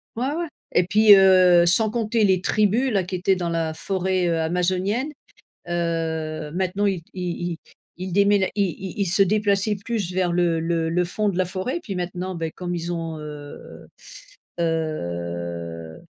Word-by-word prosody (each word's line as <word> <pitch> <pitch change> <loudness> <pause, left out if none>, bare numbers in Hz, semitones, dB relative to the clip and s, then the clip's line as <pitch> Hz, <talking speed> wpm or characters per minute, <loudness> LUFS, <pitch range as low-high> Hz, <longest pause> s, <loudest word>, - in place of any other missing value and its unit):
Ouais, 240 +3 -1
ouais 340 0 -2 0.3
et 180 - +4
puis, 210 +1 +7
heu, 185 -2 +6
sans 215 +6 +3
compter 225 0 0
les 190 -2 +3
tribus-là, 215 +2 +2
qui 185 +1 -5
étaient 185 +1 +2
dans 175 -2 -2
la 165 -1 -1
forêt, 185 0 -1
heu, 165 -1 +1
amazonienne, 185 - 0 0.6
heu, 160 -2 -2
maintenant 190 +2 0
ils 190 -4 -1
ils 175 -1 -3
ils 165 - -7 0.4
ils 185 -1 -5
démén 200 0 +3
ils 190 +1 -2
ils 200 - +2
se 190 +4 +3
déplaçaient 205 +1 +2
plus 210 -6 -2
vers 180 -1 0
le 170 -1 +2
le 165 0 -1
le 180 +2 +1
fond 210 +4 -1
de 190 -3 -2
la 185 - +3
forêt 185 - -3
et 345 - -3
puis 205 - -6
maintenant, 180 +1 -4
ben, 165 -2 -3
comme 175 +1 -5
ils 170 +1 -3
ont, 165 -2 -4
heu 150 -1 -10 0.7
heu 85 - -3
180 Hz, 170 wpm, -23 LUFS, 165-200 Hz, 0.7 s, puis